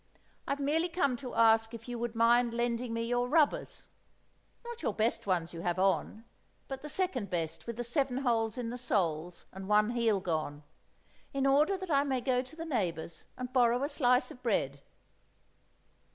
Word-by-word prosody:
I've 280 - -1
merely 315 +5 +1
come 280 -7 +1
to 250 -1 -7
ask 225 0 +4
if 230 +1 -11
you 240 -1 -4
would 235 -1 -3
mind 235 +1 +4
lending 240 0 -1
me 230 0 -1
your 245 +1 0
rubbers—not 335 - -3
your - - -1
best 220 -1 0
ones 175 -3 0
you 165 - -6
have 175 0 -1
on, 195 +4 0 0.4
but 270 -1 -6
the 300 - -7
second 285 - -1
best 165 -2 -3
with 235 -1 -5
the 240 - -2
seven 260 +1 0
holes 230 -4 0
in 235 -2 -3
the 245 - -5
soles 175 -7 -1
and 190 0 -8
one 210 +2 +4
heel 230 -4 +2
gone—in 155 - -5
order 295 +8 +4
that 375 -2 -6
I 280 -1 +4
may 265 -3 0
go 250 0 +1
to 255 +4 -12
the 330 0 -6
neighbours 175 - -3
and 255 0 -6
borrow 245 0 +3
a - - +1
slice 250 -3 +2
of 250 - -12
bread. 140 - -1
240 Hz, 180 wpm, -31 LUFS, 205-270 Hz, 0.4 s, ask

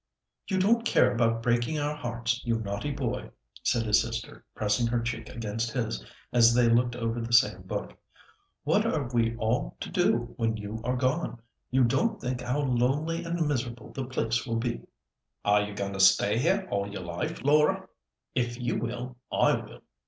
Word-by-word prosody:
"You 190 - 0
don't 225 +5 +3
care - - +4
about 115 -1 +1
breaking 120 +5 +1
our 145 0 -1
hearts, 120 -2 -2
you 115 -2 +1
naughty 100 +6 -3
boy!" 135 -4 -3 0.3
said 120 -3 +1
his 110 -1 +4
sister, 115 0 -5
pressing 110 +3 +1
her 120 0 +1
cheek 115 -1 -4
against 115 0 -3
his, 120 -4 -2 0.3
as 120 -1 +6
they 120 -1 +5
looked 120 +1 +3
over 115 0 -2
the 115 +1 -5
same 120 - +4
book. - - -5 0.7
"What - - +3
are 145 -5 0
we 115 -1 +2
all 110 - -1
to - - -6
do 120 0 +1
when 115 -2 0
you 105 +2 -6
are 125 +1 0
gone! 130 +1 -1 0.3
You 130 0 +3
don't 220 - +1
think 125 -1 -3
how 125 +4 -1
lonely 145 +6 0
and 170 -1 -1
miserable 120 -4 -3
the 135 - -3
place 115 -2 -1
will 115 - -3
be." 120 +1 -2 0.6
"Are 105 0 +5
you 105 0 -4
going 100 -1 -3
to 95 - -5
stay 100 +3 +5
here 190 +7 +1
all 100 0 -1
your 95 -2 -6
life, 85 - -4
Laura? 150 +2 +3 0.5
If 120 0 -1
you 120 -2 -1
will, 120 +2 -5
I - - +4
will. - - -5
120 Hz, 180 wpm, -28 LUFS, 115-130 Hz, 0.7 s, as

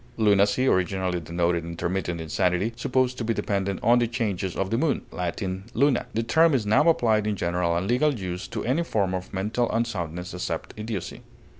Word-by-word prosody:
Lunacy 105 +2 +3
originally 95 -4 +1
denoted 85 +1 0
intermittent 85 +1 -3
insanity, 90 +6 0
supposed 125 +1 0
to - - -2
be 115 0 0
dependent 100 -1 -1
on 120 +1 +5
the 120 - +2
changes 105 -6 -2
of 95 0 -2
the 115 - +2
moon 155 -1 +1
(L. 90 -1 -1 0.4
luna): 140 +1 +2
the 115 - +1
term 160 +5 +4
is 115 -5 0
now 110 +10 +4
applied 110 -9 +2
in 105 - 0
general 85 -2 0
and 90 - -1
legal 135 +4 +2
use 90 -3 -5
to 115 -2 -5
any 135 +8 +1
form 100 - 0
of 95 0 -4
mental 105 +5 -1
unsoundness 90 -7 -3
except 90 -2 -4
idiocy. 105 -3 -5
100 Hz, 180 wpm, -25 LUFS, 90-120 Hz, 0.4 s, on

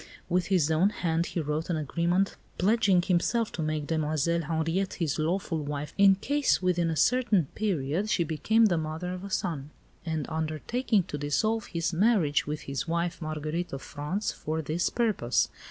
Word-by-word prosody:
With 180 0 +1
his 175 -6 +2
own 165 +6 +4
hand 170 -4 -1
he - - -3
wrote 150 +2 -2
an 170 - 0
agreement 170 +6 0 0.2
pledging 195 -2 +3
himself 205 +5 +1
to - - -4
make 155 -1 -1
Demoiselle 160 +1 0
Henriette 165 +5 -1
his 160 -4 -1
lawful 165 +1 -1
wife 145 0 -4
in 195 -1 +6
case, 285 +8 +1
within 175 -2 +1
a 160 - -1
certain 230 - +3
period, 185 -1 -1
she 175 - +2
became 215 +8 +2
the 175 -6 +2
mother 160 +3 -4
of 185 +1 -7
a 200 - -6
son; 160 -7 -2 0.3
and 160 -3 -2
undertaking 160 - 0
to 150 -4 -6
dissolve 215 +11 0
his 170 +1 -2
marriage 175 -7 +2
with 150 +1 -3
his 140 +4 -4
wife, 170 +1 -1
Marguerite 155 +2 -3
of 135 - -5
France, 155 +8 -3
for 160 +1 -4
this 160 +4 0
purpose. 215 - +1
170 Hz, 170 wpm, -28 LUFS, 155-195 Hz, 0.3 s, in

